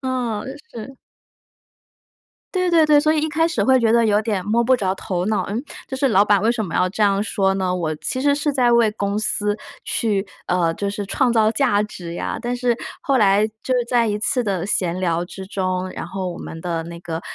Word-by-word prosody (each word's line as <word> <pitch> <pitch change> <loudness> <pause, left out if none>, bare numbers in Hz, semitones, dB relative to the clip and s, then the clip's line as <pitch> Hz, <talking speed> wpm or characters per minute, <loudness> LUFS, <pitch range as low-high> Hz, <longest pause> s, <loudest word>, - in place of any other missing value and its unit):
哦， 250 -5 -2 0.3
是。 250 +4 -9 1.6
对 365 -1 +1
对 325 -2 +5
对， 300 -1 +6
所 310 +1 +3
以 310 - +1
一 310 - -1
开 320 +2 +2
始 335 - -1
会 260 0 +4
觉 230 -2 +2
得 235 -1 +4
有 210 0 +3
点 210 -4 -1
摸 230 +3 +2
不 260 +2 +4
着 190 -5 0
头 185 -2 -3
脑， 215 0 0
嗯？ 225 +5 -2 0.2
就 - - -6
是 275 +1 +2
老 205 -3 +4
板 205 -2 +3
为 220 +3 +2
什 235 -2 -1
么 180 - -6
要 180 - +2
这 205 +3 -2
样 200 -1 +3
说 195 -3 +1
呢？ 185 -2 -1
我 160 -3 -2
其 255 +11 -3
实 285 0 +3
是 295 +1 0
在 250 -4 +2
为 235 -2 +4
公 200 -1 -2
司 210 -1 0 0.3
去 205 -3 0 0.2
呃， 175 -2 +1
就 200 - -3
是 205 +1 -4
创 250 +5 +1
造 220 -2 +3
价 230 -6 +2
值 175 -5 -7
呀， - - -3
但 245 +1 -2
是 245 -1 +1 0.3
后 270 -2 +2
来 205 0 +4 0.2
就 260 - 0
在 240 -1 +2
一 210 0 -1
次 250 +4 0
的 195 -6 -2
闲 180 -3 0
聊 170 -2 0
之 190 +1 -9
中， 185 -1 -2
然 165 - -6
后 185 0 -4
我 - - -9
们 165 - -8
的 170 -2 -2
那 170 0 -8
个 165 -2 -5
210 Hz, 240 characters per minute, -21 LUFS, 190-245 Hz, 1.6 s, 对